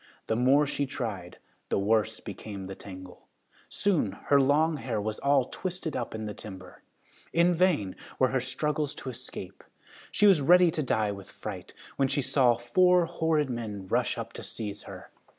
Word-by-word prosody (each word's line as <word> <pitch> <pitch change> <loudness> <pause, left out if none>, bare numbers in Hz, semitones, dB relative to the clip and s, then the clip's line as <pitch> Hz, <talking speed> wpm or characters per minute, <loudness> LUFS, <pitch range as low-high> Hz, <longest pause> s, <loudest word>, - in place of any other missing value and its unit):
The 110 - 0
more 135 +5 +4
she 140 0 -2
tried, 105 -10 -5 0.3
the - - +1
worse 110 +2 +1
became 100 -1 -7
the 95 - -6
tangle. 95 -2 -11 0.4
Soon 165 - +1
her 140 +7 +2
long 150 +4 +3
hair 120 -6 -2
was 105 +1 -3
all 140 -2 +3
twisted 180 0 -5
up 120 -2 -3
in 110 0 -4
the 105 - -4
timber. 95 -3 -11 0.5
In 170 +1 +4
vain 165 - +2 0.2
were 130 - +3
her 130 -1 0
struggles 150 +3 -2
to 130 - -6
escape. 100 -6 -8 0.5
She 210 - +3
was 190 -7 +6
ready 175 +4 +6
to 155 - -2
die 110 -6 +1
with 100 -1 -9
fright, - - -8 0.2
when 135 - +3
she 140 +1 0
saw 130 -2 +4
four 180 +9 +4
horrid 160 -4 0
men 105 -5 -5
rush - - 0
up - - -6
to - - -7
seize 105 -2 -5
her. - - -10
130 Hz, 175 wpm, -28 LUFS, 105-150 Hz, 0.5 s, was